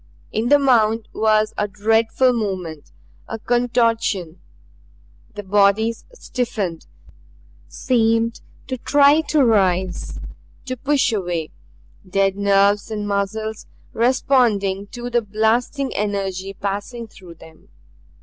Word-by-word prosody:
In 225 +2 -1
the 290 - +7
mound 230 -5 +2
was 215 0 +2
a 210 - +1
dreadful 225 +5 +2
movement, 185 -9 -4 0.4
a 225 - -5
contortion; 230 -7 0 0.9
the 205 - -6
bodies 205 +3 +2
stiffened, 220 - -4 0.8
seemed 230 - 0 0.2
to 260 -2 -5
try 290 +4 +4
to 295 -3 +3
rise, 190 -5 0 0.5
to 255 -1 -3
push 270 -1 +1
away 175 -6 -3 0.5
dead 195 0 0
nerves 200 +1 +2
and 210 -1 -4
muscles 210 +2 -3 0.3
responding 230 -5 +1
to 245 +2 -7
the 240 0 +2
blasting 225 +6 0
energy 195 -2 -3
passing 205 +5 -4
through 180 -5 -14
them. 160 0 -17
215 Hz, 105 wpm, -20 LUFS, 195-240 Hz, 0.9 s, the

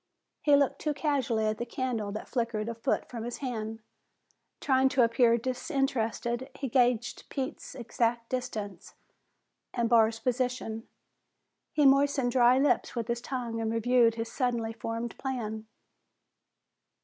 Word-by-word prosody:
He 290 -1 +5
looked 280 -1 +2
too 300 -2 -1
casually 265 -7 0
at 215 0 -1
the - - -1
candle 235 -5 -2
that 215 - -6
flickered 230 -3 -2
a 235 - -2
foot 225 - -1
from 230 -2 -6
his 240 0 -4
hand. 225 -4 -4 0.8
Trying 265 -1 +3
to 265 -2 +3
appear 230 0 +4
disinterested, 255 -1 -1
he 270 -1 -4
gauged 240 -1 +1
Pete's 265 -1 -5
exact 235 -1 -1
distance 215 -7 -5 0.8
and 235 -2 +1
Barr's 225 -1 +4
position. 245 -2 -2 0.8
He 300 -2 +2
moistened 275 -2 +4
dry 245 0 +5
lips 275 -1 +2
with 235 -1 -3
his 235 0 -1
tongue 240 -3 -3
and 220 0 -1
reviewed 230 0 +3
his 230 0 -4
suddenly 235 -4 -1
formed 230 +1 -4
plan. 220 -5 -4
240 Hz, 135 wpm, -29 LUFS, 225-260 Hz, 0.8 s, He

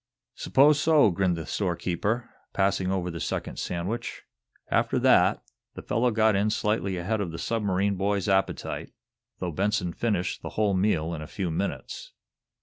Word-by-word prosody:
"'Spose 145 +2 +4
so," 150 -8 +5
grinned 90 0 +1
the 80 - -5
storekeeper, 100 +5 -1 0.3
passing 95 -1 +1
over 90 -2 -1
the 85 - -6
second - - -3
sandwich. 95 +8 -4 0.5
After - - +2
that, - - +4 0.3
the - - -8
fellow 120 +3 +1
got 110 -2 +3
in 100 +2 +2
slightly 105 -3 0
ahead 105 +5 -1
of 95 - -2
the 80 - -6
submarine 100 0 0
boy's 100 0 0
appetite, 95 -1 -1 0.4
though 90 -2 -3
Benson 95 0 0
finished 100 -2 -1
the - - -5
whole 105 -2 +2
meal 90 -4 +1
in 80 - -5
a 75 - -7
few 90 -1 -3
minutes. 100 - -4
100 Hz, 155 wpm, -27 LUFS, 90-110 Hz, 0.5 s, so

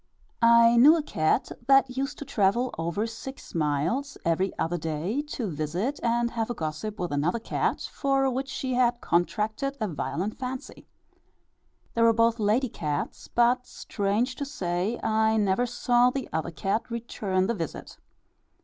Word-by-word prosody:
I 235 0 +6
knew 295 +7 +8
a 315 - -2
cat 160 - 0 0.2
that 270 -2 +4
used 275 +2 -2
to 290 - -7
travel 235 +1 +1
over 170 +6 -2
six 230 +4 -8
miles 165 - -1
every 175 +3 +1
other 175 +2 -1
day 165 - -2
to 265 -5 -4
visit 175 - -2
and 235 0 +1
have 225 -1 -2
a 240 - -2
gossip 165 +7 -4
with 175 -3 -2
another 150 +8 +1
cat 230 - -1
for 270 -1 0
which 265 +1 -2
she 260 -1 -3
had 245 -1 +2
contracted 215 +11 -1
a 215 - 0
violent 185 +4 -3
fancy. 255 0 -6 1.1
They 230 - 0
were 230 0 +6
both 230 +1 +2
lady 220 +5 +2
cats; 150 -7 -4
but, 245 +1 +2
strange 215 +5 -1
to 285 - -3
say, 190 -4 -2
I 220 0 +2
never 210 +4 +2
saw 245 +1 +3
the 265 0 -4
other 160 +1 -1
cat 195 +8 -2
return 210 -5 -1
the 230 - 0
visit. 165 -8 -6
225 Hz, 160 wpm, -27 LUFS, 180-250 Hz, 1.1 s, knew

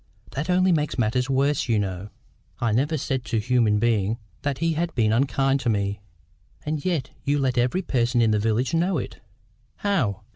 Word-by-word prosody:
That 150 +6 -4
only 185 +1 +3
makes 150 -5 0
matters 125 +2 0
worse, 135 0 +1
you 115 - +3
know." 95 -1 -3 0.5
"I 120 -2 +1
never 145 +8 +1
said 130 -2 -2
to 115 - -1
human 115 -2 +2
being 110 -1 +1 0.2
that 145 -2 -2
he 165 +2 0
had 165 +2 -2
been 110 -3 +2
unkind 135 +2 +2
to 120 - -1
me." 100 -2 -1 0.6
"And 150 -1 -2
yet 165 -8 -1
you 145 +1 +1
let 130 -3 0
every 125 +10 +1
person 120 -5 +1
in 115 -2 +4
the 105 - +2
village 115 +5 0
know 175 +3 +1
it." - - -5 0.6
"How?" 120 - -1
125 Hz, 185 wpm, -24 LUFS, 110-150 Hz, 0.6 s, in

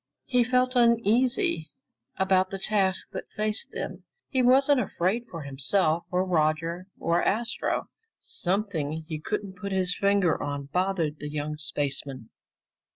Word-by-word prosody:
He 250 -2 +3
felt 255 +1 +2
uneasy 235 - +3 0.5
about 190 -1 +3
the 195 - -4
task 190 -1 0
that - - -6
faced 215 0 -1
them. - - -6 0.3
He 260 - +1
wasn't 270 +3 +5
afraid 220 +7 -1
for 165 -3 -6
himself, 155 +5 +1
or 180 +1 +1
Roger, 165 +1 0
or 170 +1 +1
Astro. 235 +4 0 0.3
Something 170 -5 -2
he 155 -2 -4
couldn't 190 +4 -4
put 200 +1 -4
his 185 -1 +1
finger 200 -5 +2
on 145 -1 -4
bothered 180 -5 0
the 150 - -5
young 150 0 -3
spaceman. 140 -4 -4
185 Hz, 135 wpm, -27 LUFS, 155-215 Hz, 0.5 s, wasn't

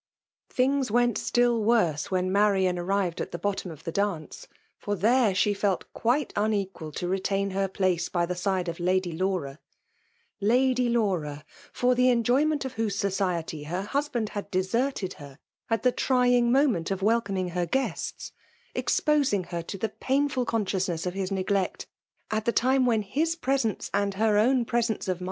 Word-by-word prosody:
Things 265 0 +1
went 240 0 +2
still 240 -2 +2
worse 190 -10 +2
Kdien 185 0 0
Marmn 190 -3 +2
arrived 185 -1 -1
at - - -4
the - - -4
bottom 195 +1 -2
of 160 -1 -11
the 165 - -4
dance, 195 -5 -3 0.3
for 205 - -2
tkere 225 +2 +3
sheltUt 200 -1 +1
quite 255 +4 0
imequal 200 -6 -1
to 175 - -3
retain 195 +1 -1
her 195 +1 0
plaee 185 -3 0
by 175 -1 +1
the 180 - -3
side 185 0 -1
of 170 0 -4
Lady 185 0 +1
Lava; 165 -5 -2 0.4
— 470 - -42
Lady 255 -1 +2
Laura 175 -11 -1
— - - -22
fer 250 0 +2
the 250 +1 +3
enjoy 245 +4 +3
ment 305 -3 0
of 260 - -5
whose 220 -3 -1
society 180 -6 -2
her 180 +5 -3
hersbaad 275 -6 -1
had 205 -1 -6
^ 185 - +2
serted 230 0 -1
her 140 -2 -11 0.3
at 225 -2 0
the 250 - +4
trying 245 -2 +2
moment 250 - +2
of 195 -1 -2
welcoming 200 -4 +1
his 175 0 -2
guests; 265 0 -2 0.4
exposing 285 - +1
her 170 -1 -5
to 180 +4 -7
the 220 +3 -2
painlht 275 +6 0
eos 215 -6 0
sdou^nesB 170 -1 -3
of 180 - -2
his 190 0 -3
neglect 195 0 -1 0.5
at 215 0 -1
the 235 - +3
time 260 +2 +2
when 225 -3 +2
his 315 +11 0
mfJUC 265 -7 -1
DaMIffATlOK. 215 0 +1
205 Hz, 165 wpm, -27 LUFS, 185-245 Hz, 0.5 s, the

